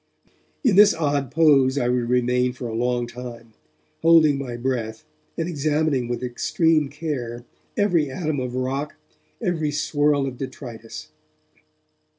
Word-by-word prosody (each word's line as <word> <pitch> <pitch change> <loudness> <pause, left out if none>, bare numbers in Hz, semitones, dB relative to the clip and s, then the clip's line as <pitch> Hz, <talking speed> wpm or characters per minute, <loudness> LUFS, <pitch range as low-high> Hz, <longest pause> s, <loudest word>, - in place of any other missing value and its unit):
In 235 -8 +3
this 205 0 +7
odd 145 -4 0
pose 140 -4 +4
I 120 - +1
would 125 -1 0
remain 125 0 +2
for 125 -1 -6
a 115 - -5
long 120 +1 0
time, 120 -2 -9 0.5
holding 160 -4 +5
my 125 -3 -5
breath 120 -3 -3 0.3
and 165 - -1
examining 150 -4 0
with 120 +1 -3
extreme 155 +4 +1
care 125 -6 -5 0.3
every 175 -8 +2
atom 155 0 -2
of 125 -1 -4
rock, 135 +3 -2 0.5
every 165 -6 0
swirl 145 -1 +1
of 130 -2 -6
detritus. 120 -4 -8
135 Hz, 135 wpm, -23 LUFS, 125-155 Hz, 0.5 s, this